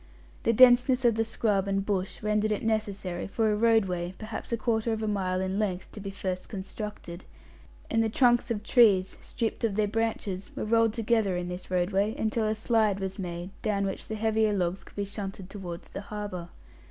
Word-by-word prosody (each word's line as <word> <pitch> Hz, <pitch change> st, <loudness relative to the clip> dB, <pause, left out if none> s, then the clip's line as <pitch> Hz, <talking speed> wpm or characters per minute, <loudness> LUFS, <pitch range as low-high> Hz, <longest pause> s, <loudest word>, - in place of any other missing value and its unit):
The 230 Hz, -, +2 dB
denseness 250 Hz, +2 st, +6 dB
of 235 Hz, -, +6 dB
the 225 Hz, +1 st, +1 dB
scrub 210 Hz, -3 st, 0 dB
and 195 Hz, 0 st, 0 dB
bush 195 Hz, -2 st, -2 dB
rendered 210 Hz, 0 st, +1 dB
it 210 Hz, -, -1 dB
necessary 200 Hz, -5 st, -2 dB
for 220 Hz, +2 st, +1 dB
a -, -, +2 dB
"roadway," 195 Hz, -6 st, +2 dB
perhaps 215 Hz, +2 st, -6 dB
a 235 Hz, -, +1 dB
quarter 225 Hz, 0 st, 0 dB
of 220 Hz, 0 st, -2 dB
a -, -, -1 dB
mile 185 Hz, -3 st, 0 dB
in 190 Hz, +2 st, -1 dB
length, 190 Hz, -4 st, -2 dB
to -, -, -9 dB
be 200 Hz, -1 st, -5 dB
first 185 Hz, -2 st, -4 dB
constructed; 195 Hz, -2 st, -7 dB, 0.6 s
and 225 Hz, 0 st, +2 dB
the 220 Hz, -, +1 dB
trunks 240 Hz, +1 st, +3 dB
of 215 Hz, -3 st, -2 dB
trees, 210 Hz, -6 st, +4 dB
stripped 230 Hz, 0 st, -3 dB
of 220 Hz, -4 st, +1 dB
their 210 Hz, 0 st, +2 dB
branches, 210 Hz, -3 st, -2 dB
were -, -, -3 dB
rolled 225 Hz, 0 st, +3 dB
together 225 Hz, -4 st, +1 dB
in 180 Hz, 0 st, -3 dB
this 180 Hz, +1 st, -6 dB
roadway, 195 Hz, +4 st, +1 dB
until 220 Hz, 0 st, 0 dB
a 215 Hz, -, 0 dB
"slide" 215 Hz, -2 st, +2 dB
was 190 Hz, +1 st, -4 dB
made, 175 Hz, 0 st, -5 dB
down 200 Hz, -2 st, 0 dB
which 195 Hz, -, -4 dB
the 220 Hz, -, -4 dB
heavier 220 Hz, 0 st, +2 dB
logs 185 Hz, -1 st, -1 dB
could -, -, -17 dB
be 205 Hz, -, -2 dB
shunted 195 Hz, -2 st, -6 dB
towards 180 Hz, -4 st, -7 dB
the -, -, -6 dB
harbour. 205 Hz, -4 st, -6 dB
210 Hz, 200 wpm, -28 LUFS, 190-220 Hz, 0.6 s, denseness